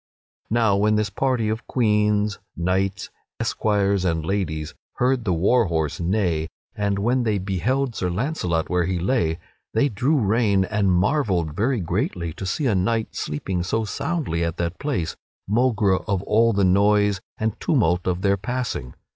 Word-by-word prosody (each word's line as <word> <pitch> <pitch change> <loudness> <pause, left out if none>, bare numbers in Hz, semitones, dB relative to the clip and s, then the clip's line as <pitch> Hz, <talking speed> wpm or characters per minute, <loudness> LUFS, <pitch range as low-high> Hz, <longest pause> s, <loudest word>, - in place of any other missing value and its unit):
Now 110 -3 +3
when 105 +1 +3
this 105 -2 0
party 125 0 0
of 110 +1 -3
queens, 105 -3 +1 0.2
knights, 95 +3 -1 0.3
esquires, 100 -3 +1
and 80 -3 0
ladies 80 -6 -2 0.2
heard 125 -1 +1
the 95 - +1
war 100 +8 +3
horse 80 -4 -1
neigh, 85 -3 0 0.3
and 100 -1 0
when 120 +6 +1
they 110 -3 +1
beheld 110 +8 -1
Sir 90 -4 -2
Launcelot 90 - -1
where 90 -1 +1
he 95 0 -1
lay, 85 -4 0 0.4
they 140 +6 +3
drew 130 +8 +1
rein 105 -4 +2
and 100 -2 +1
marvelled 90 - +1
very 115 +3 +1
greatly 85 0 -2
to 95 - -6
see 140 - -1
a 120 - +3
knight 110 +4 0
sleeping 85 +5 -3
so 110 +5 -1
soundly 120 - -2
at 85 +1 -2
that 85 0 -3
place, 130 - -2 0.3
maugre 105 -3 +2
all 105 +4 +1
the 100 -2 +2
noise 100 +1 +3 0.2
and 110 -1 -2
tumult 90 - +1
of 90 0 -1
their 100 0 +3
passing. 120 - -4
100 Hz, 155 wpm, -23 LUFS, 90-115 Hz, 0.4 s, Now